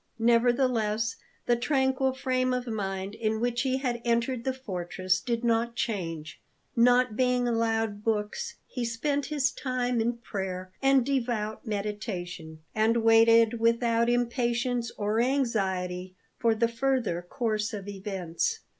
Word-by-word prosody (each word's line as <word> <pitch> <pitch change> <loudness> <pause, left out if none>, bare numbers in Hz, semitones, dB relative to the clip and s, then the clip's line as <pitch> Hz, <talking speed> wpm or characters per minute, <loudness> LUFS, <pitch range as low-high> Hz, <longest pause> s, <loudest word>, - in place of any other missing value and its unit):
Nevertheless, 230 -2 +2 0.3
the 240 - +3
tranquil 265 +1 +1
frame 255 -1 0
of 250 0 -3
mind 195 -3 -3
in 220 0 -1
which 240 +1 0
he 260 -1 +1
had 245 -3 -2
entered 235 +1 0
the 265 - +2
fortress 185 -6 -2
did 235 -1 -2
not 235 0 +1
change. 165 -10 -3 0.3
Not 245 -1 +4
being 250 0 +2
allowed 225 -2 0
books, 215 - -2
he 250 - -4
spent 275 +5 -1
his 285 -3 +1
time 250 -2 -1
in 235 +2 +1
prayer 185 -5 -5
and 270 -2 +4
devout 235 -5 -2
meditation, 185 -6 -4
and 225 +1 +2
waited 225 0 +5
without 230 0 +2
impatience 240 0 0
or 210 +2 0
anxiety 190 -8 -1 0.2
for 230 -1 +3
the 230 +1 +2
further 235 -6 0
course 215 +2 -2
of 205 -3 -6
events. 190 -4 -3
230 Hz, 130 wpm, -28 LUFS, 210-245 Hz, 0.3 s, waited